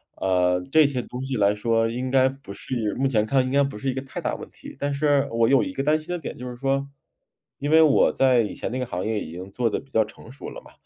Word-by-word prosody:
呃， 90 -1 +1
这 155 -1 +6
些 130 -3 -2
东 125 +2 -7
西 135 0 -3
来 100 -2 +3
说 115 +2 +1
应 125 +3 -3
该 130 0 +4
不 135 -6 -10
是 110 +1 -3
目 135 +2 +1
前 110 -5 +1
看 130 +3 +2
应 130 - -3
该 140 +1 +4
不 140 -5 -4
是 135 +5 -2
一 - - 0
个 130 - -3
太 135 - -7
大 - - -2
问 - - -9
题。 - - -12
但 140 0 -1
是 140 -1 +2
我 115 0 +2
有 135 -2 +5
一 140 - -3
个 135 - -2
担 155 +2 +2
心 155 - -15
的 180 - -1
点 160 - -7
就 125 +1 -6
是 125 - -7
说， 135 +2 -1 0.7
因 145 - -2
为 160 +1 +6
我 155 -3 +5
在 130 -2 +4
以 105 - -3
前 - - -5
那 130 - -3
个 125 - -1
行 90 -5 -4
业 110 -1 -1
已 - - -6
经 90 +3 -8
做 120 +2 0
得 - - -2
比 135 0 -19
较 110 - +3
成 110 +2 -14
熟 135 - -8
了 - - -9
嘛， - - -17
130 Hz, 315 characters per minute, -24 LUFS, 110-140 Hz, 0.7 s, 这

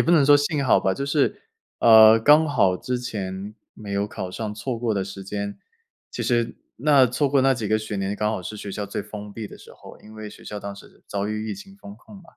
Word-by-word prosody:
也 - - +5
不 170 - 0
能 155 -5 +5
说 145 +1 +7
幸 145 0 +1
好 120 - +4
吧， 95 - 0
就 140 - -3
是， 145 0 0 0.4
啊， 110 -1 +8
刚 150 +6 +5
好 95 -10 +3
之 125 +7 -3
前 100 -3 -5 0.2
没 105 -2 -8
有 100 +1 0
考 95 -3 -6
上 105 +1 -5
错 120 +2 -4
过 115 -3 -1
的 95 -1 -1
时 100 0 -8
间， 100 +1 -5 0.5
其 - - -5
实 120 -2 0 0.2
那 140 0 +5
错 135 +4 0
过 135 -1 +3
那 135 0 +4
几 115 -5 -3
个 110 0 +2
学 110 -1 -5
年， 100 +1 -2
刚 105 0 0
好 100 - -3
是 105 +4 -7
学 100 -1 -7
校 105 0 -4
最 100 - -4
封 105 -1 -9
闭 110 0 -7
的 - - -13
时 - - -15
候， - - -14
因 110 +1 -15
为 110 -1 -8
学 - - -14
校 105 - -6
当 100 0 -7
时 100 - -16
遭 100 +1 -3
遇 110 0 -3
疫 - - -3
情 195 0 -13
封 100 - -11
控 200 - -16
嘛， 195 - -14
110 Hz, 275 characters per minute, -23 LUFS, 100-130 Hz, 0.5 s, 啊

